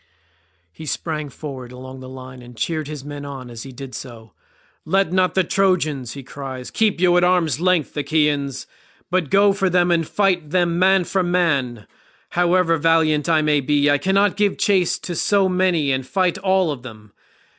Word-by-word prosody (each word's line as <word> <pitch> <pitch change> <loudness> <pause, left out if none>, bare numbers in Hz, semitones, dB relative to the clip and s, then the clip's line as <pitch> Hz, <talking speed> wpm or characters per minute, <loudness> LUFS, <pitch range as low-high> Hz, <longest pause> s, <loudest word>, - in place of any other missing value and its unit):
He 155 - -11
sprang 155 0 -3
forward 130 -3 -8
along 130 +1 -10
the 130 0 -10
line 130 -1 -10
and 120 -1 -14
cheered 155 +4 -2
his 150 -2 -7
men 145 -1 -7
on 135 -3 -8
as 115 -1 -8
he 135 - -9
did 130 0 -9
so. 115 -4 -10 0.5
"Let 190 +1 +1
not 185 -1 +2
the 190 - +3
Trojans," 165 -10 0
he 140 - -9
cried, 130 -1 -8
"keep 215 -5 +1
you 175 -1 +4
at 175 - +3
arm's 175 -6 +2
length, 180 -5 +1
Achaeans, 145 -2 0 0.5
but 180 -5 0
go 200 0 +4
for 195 -1 0
them 175 0 +2
and 165 -2 +1
fight 185 -6 0
them 175 0 +1
man 190 0 +4
for 190 +2 -1
man. 145 - 0 0.4
However 175 -1 +2
valiant 160 -1 +2
I 160 -2 +3
may 150 -1 +2
be, 145 +1 +2
I 145 - +2
cannot 195 +5 +2
give 205 -1 +1
chase 190 -4 +2
to 175 - -6
so 195 +3 +2
many 180 -6 +1
and 130 0 -1
fight 180 +5 0
all 190 -3 +2
of 135 -4 -6
them. 110 -4 -12
155 Hz, 185 wpm, -21 LUFS, 135-185 Hz, 0.5 s, you